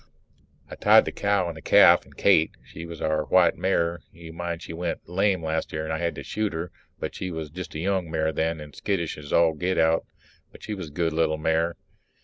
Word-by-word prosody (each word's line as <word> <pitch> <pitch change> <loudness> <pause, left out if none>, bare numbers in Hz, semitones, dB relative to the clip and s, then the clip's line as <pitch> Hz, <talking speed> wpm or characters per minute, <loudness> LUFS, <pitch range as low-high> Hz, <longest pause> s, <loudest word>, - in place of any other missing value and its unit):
I - - -11
tied - - +5
the - - -3
cow 100 -3 0
and 85 - -5
the 80 - -10
calf - - +6
and - - -20
Kate 80 0 +4 0.2
she 85 - -9
was 85 -1 -8
our 80 -1 0
white 90 -2 +4
mare; 85 -2 0
you 80 0 -12
mind 85 0 -4
she 80 - -7
went 85 0 -4
lame 95 0 +1
last 80 0 -2
year 75 0 -3
and 80 0 -3
I 80 - -2
had 85 -1 -1
to - - -7
shoot 110 -3 -2
her, 80 +1 -4 0.3
but - - -4
she 95 - -5
was 80 -3 -6
just 90 -1 -8
a - - -3
young 95 -1 -1
mare 80 -1 0
then 80 +1 -1
and 75 -1 -11
skittish 85 -5 -2
as 70 -1 -10
all 85 -1 +4
get 90 +4 -2
out 80 0 +2 0.4
but - - -16
she 105 - -4
was 95 -5 -6
a - - -12
good 80 +1 -1
little 80 -1 +1
mare. 80 +2 0
85 Hz, 235 wpm, -25 LUFS, 80-90 Hz, 0.4 s, calf